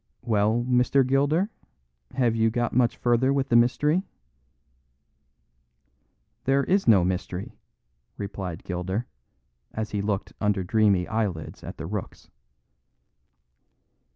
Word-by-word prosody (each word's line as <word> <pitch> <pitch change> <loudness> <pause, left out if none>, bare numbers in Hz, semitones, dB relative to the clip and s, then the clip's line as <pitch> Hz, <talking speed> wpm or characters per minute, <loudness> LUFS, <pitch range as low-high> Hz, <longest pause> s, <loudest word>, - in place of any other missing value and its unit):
"Well, 110 +2 +1
Mr. 125 +2 +3
Gilder, 145 - +1 0.6
have 120 -3 +2
you 115 0 +3
got 120 +1 -1
much 120 -1 +2
farther 120 +2 +2
with 140 -1 0
the 120 - +2
mystery?" 150 +8 +3 2.4
"There 135 +1 +3
is 195 +5 +1
no 100 -6 +6
mystery," 90 0 -3 0.7
replied 95 -4 -5
Gilder, 95 +6 -3 0.7
as 110 0 -4
he 105 - -1
looked 100 -1 -2
under 105 -2 +1
dreamy 100 -2 +2
eyelids 100 -8 -3
at - - -8
the 80 - -6
rooks. 100 +2 -6
110 Hz, 110 wpm, -25 LUFS, 100-125 Hz, 2.4 s, no